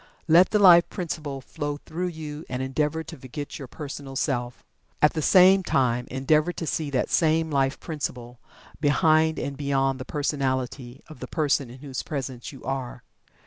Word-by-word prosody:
Let 170 +3 +6
the 215 - +2
Life 175 -4 +7
Principle 150 -6 -5
flow 145 +1 -4
through 175 +5 -4
you, 155 -3 -7
and 125 - -3
endeavor 150 +4 -1
to 165 0 -10
forget 135 +3 -7
your 135 - -7
personal 140 -1 -8
self. 125 -3 -2 0.4
At 150 - +4
the 160 - -2
same 190 +4 +6
time, 125 -7 0
endeavor 150 +6 +2
to 165 - -5
see 155 -1 -2
that 130 -3 -1
same 160 -1 +2
Life 135 -1 +1
Principle, 125 -6 -6 0.4
behind 155 +2 +3
and 140 - -3
beyond 135 -1 0
the 130 - -6
personality 130 -3 -2
of 155 -5 -12
the - - -6
person 145 -5 0
in 125 - -11
whose 135 -3 -5
presence 130 -4 -5
you 135 - -13
are. 130 -2 -4
145 Hz, 170 wpm, -25 LUFS, 130-160 Hz, 0.4 s, Life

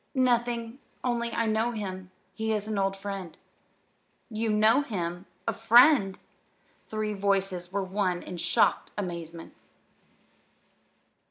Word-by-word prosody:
"Nothing, 240 -1 +1 0.2
only 235 -1 0
I 230 - 0
know 220 +2 +1
him. 190 -4 -5 0.2
He 220 0 -1
is 210 -1 -1
an 215 -2 -2
old 195 0 0
friend." 195 -4 -6 0.9
"You 220 +1 -1
know 215 +5 +4
him! 180 -7 -4 0.2
a 230 - +1
friend!" 230 -1 +6
The - - -35
three 215 -1 -2
voices 195 -3 0
were 200 0 -1
one 185 -2 -1
in 180 - -7
shocked 170 +1 +2
amazement. 170 -4 -6
210 Hz, 120 wpm, -28 LUFS, 190-230 Hz, 0.9 s, friend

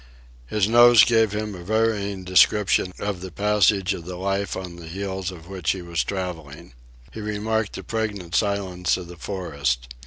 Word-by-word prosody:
His 105 - +1
nose 120 0 +7
gave 115 -3 +3
him 105 0 -3
a 90 -2 -9
varying 100 -2 0
description 95 +1 +3
of 100 -3 -3
the 95 -1 -7
passage 100 0 +2
of 85 - -7
the 90 0 -6
life 95 +1 -2
on 90 -2 -7
the 85 -1 -10
heels 95 +1 -4
of 85 -3 -11
which 95 -4 -1
he 95 -2 -7
was 85 -1 -1
travelling. 80 -9 -6 0.4
He 110 - -7
remarked 105 +1 -2
the - - -7
pregnant 105 -7 -4
silence 95 -2 0
of 90 - -7
the 90 - -10
forest. 70 -10 -3
95 Hz, 175 wpm, -23 LUFS, 90-105 Hz, 0.4 s, nose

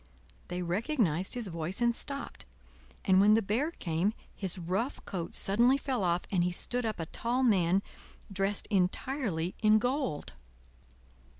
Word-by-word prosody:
They 180 0 -3
recognized 190 - 0
his 240 -2 -3
voice 170 0 -3
and 235 -1 +2
stopped; 275 +2 -5 0.6
and 190 0 +5
when 210 +2 +6
the 225 - +3
Bear 230 +10 0
came, 185 - -1 0.2
his 190 -2 0
rough 190 +9 -2
coat 170 -3 -5
suddenly 240 +7 +4
fell 260 -6 -1
off, 175 0 +1
and 180 -3 +2
he 180 - +1
stood 245 +6 -1
up 215 - -3
a 165 - -2
tall 240 +9 -1
man, 190 -4 +3 0.5
dressed 195 +1 0
entirely 190 - 0
in 215 -1 +6
gold. 245 - -2
200 Hz, 145 wpm, -30 LUFS, 180-240 Hz, 0.6 s, when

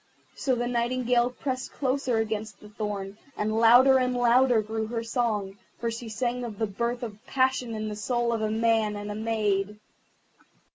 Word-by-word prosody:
So 260 -2 0
the 240 0 -1
Nightingale 245 0 +1
pressed 255 0 -4
closer 260 -3 0
against 215 -1 -3
the 210 - -13
thorn, 205 -1 -5 0.2
and 215 +1 -1
louder 250 +4 +7
and 250 0 0
louder 245 0 +4
grew 220 +1 -3
her 230 0 -3
song, 220 -4 -2 0.2
for 235 0 -2
she 230 0 -6
sang 245 +2 -2
of 225 -4 -6
the 220 - 0
birth 235 +4 -3
of 215 -2 -7
passion 260 -3 +1
in 215 0 -3
the 210 - -4
soul 240 +2 0
of 225 - -1
a 215 - 0
man 220 -1 +1
and 205 0 -5
a - - -4
maid. 210 -2 -1
230 Hz, 180 wpm, -27 LUFS, 215-245 Hz, 0.2 s, louder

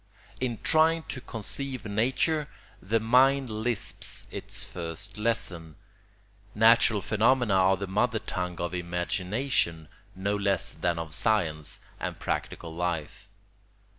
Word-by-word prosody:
In 120 -3 -1
trying 160 +1 +4
to 130 - -4
conceive 130 +4 -4
nature 130 +8 +1 0.3
the 110 +5 +1
mind 130 +3 +4
lisps 110 +1 -2
its - - -2
first 90 +5 -7
lesson; 85 -8 -2 0.8
natural 110 -1 +5
phenomena 115 +1 +3
are 95 0 +4
the 100 - -3
mother 110 +5 +1
tongue 90 -4 -4
of 85 +1 -2
imagination 90 - -1 0.3
no 100 +2 -1
less 100 -2 0
than 85 -1 -1
of 80 -2 -4
science 80 -9 0 0.2
and - - -4
practical 80 -1 -3
life. 85 -3 -3
105 Hz, 115 wpm, -28 LUFS, 90-120 Hz, 0.8 s, natural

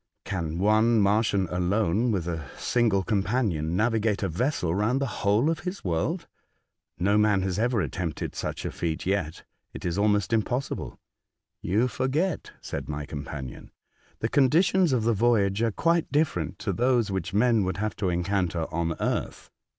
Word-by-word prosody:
Can 85 -4 -3
one 110 +4 +4
Martian 100 -1 +2
alone, 100 +5 +1
with 90 -5 -1
a 80 -5 -4
smgle 110 -6 +1
companion, 95 -6 0
navigate 110 -1 +1
a - - +1
vessel 90 - 0
round 105 +7 +1
the 140 - 0 0.2
whole 105 +7 +3
of 165 -1 0
his 180 +3 -5
world? 95 - -1 0.7
No 100 +3 +2
man 105 -3 +3
has 95 0 -1
ever 120 -1 +1
attempted 85 +1 -3
such - - -4
a - - -2
feat 80 -2 -3
yet. 85 -5 -1 0.3
It - - -7
is 90 +2 -1
almost 105 0 +2
impossible." 125 +4 -2 0.6
"You 105 +8 +1
forget," 150 +8 -1
said - - -5
my 75 -1 -4
companion, 70 -3 -7 0.5
"the 110 - +1
conditions 165 +7 +3
of 125 -4 +1
the 115 +1 +2
voyage 105 -2 +2
are 115 -1 +2
quite 170 +8 +1
different 145 - 0
to - - -2
those 120 -3 +2
which 95 -2 -3
men 110 +1 +3
would 95 +1 -2
have 110 +1 -2
to 95 - 0
encounter 90 -1 0
on 85 0 -1
earth. - - -3
105 Hz, 160 wpm, -26 LUFS, 90-120 Hz, 0.7 s, one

